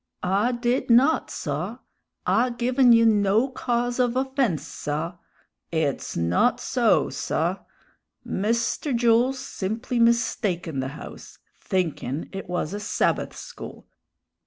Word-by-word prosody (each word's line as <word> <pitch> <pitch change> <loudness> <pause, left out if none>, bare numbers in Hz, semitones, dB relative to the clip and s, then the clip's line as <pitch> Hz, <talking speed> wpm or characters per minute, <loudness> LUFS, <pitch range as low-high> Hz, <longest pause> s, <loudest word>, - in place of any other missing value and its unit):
"I 200 +6 +2
did 240 +2 -1
not, 260 +7 +4
saw! - - -4 0.5
I 250 +2 +3
given 245 +1 +3
you 230 0 +6
no 215 +3 +3
cause 245 -1 -1
of 245 -1 +2
offense, 260 - 0
saw! 155 +4 -4 0.5
It's 160 -5 -1
not 85 +1 +2
so, - - +2
saw! - - -1 0.7
Mister 235 +7 -1
Jools 240 +2 +3
simply 225 +2 -3
mistaken 215 - +1
the 130 - -1
house, - - -11 0.2
thinkin' 165 - -2
it 195 -2 -6
was 175 -1 -2
a 205 - -3
Sabbath 210 - 0
school! - - -9
230 Hz, 115 wpm, -25 LUFS, 180-245 Hz, 0.7 s, you